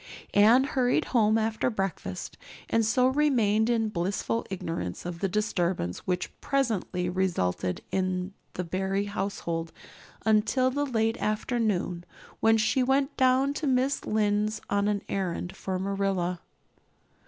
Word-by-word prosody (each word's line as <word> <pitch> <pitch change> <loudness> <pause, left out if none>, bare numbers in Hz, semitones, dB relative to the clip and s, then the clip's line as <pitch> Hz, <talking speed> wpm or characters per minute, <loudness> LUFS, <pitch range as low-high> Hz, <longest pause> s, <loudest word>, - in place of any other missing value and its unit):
Anne 225 +6 +6
hurried 260 -3 +1
home 220 -2 +4
after 220 +2 0
breakfast 195 - -4 0.4
and 230 - +3
so 250 +3 +3
remained 240 -6 +2
in 225 -2 +2
blissful 200 +4 -1
ignorance 165 - -4
of 175 -1 -5
the 195 - 0
disturbance 180 - -1
which 180 -1 -1
presently 220 -9 0
resulted 170 - -1
in 185 0 -1 0.2
the 180 - -3
Barry 190 +3 -1
household 185 -5 -3 0.5
until 225 +4 +3
the 285 +2 -1
late 225 -3 0
afternoon, 210 -5 -1 0.4
when 225 0 +4
she 220 +4 +2
went 270 +3 +1
down 260 +1 +3
to 295 +1 -3
Mrs. 265 +2 +1
Lynde's 210 0 +1
on 200 0 +2
an 205 -1 0
errand 180 -2 -3
for 190 -1 -3
Marilla. 190 -2 -1
210 Hz, 130 wpm, -28 LUFS, 185-235 Hz, 0.5 s, Anne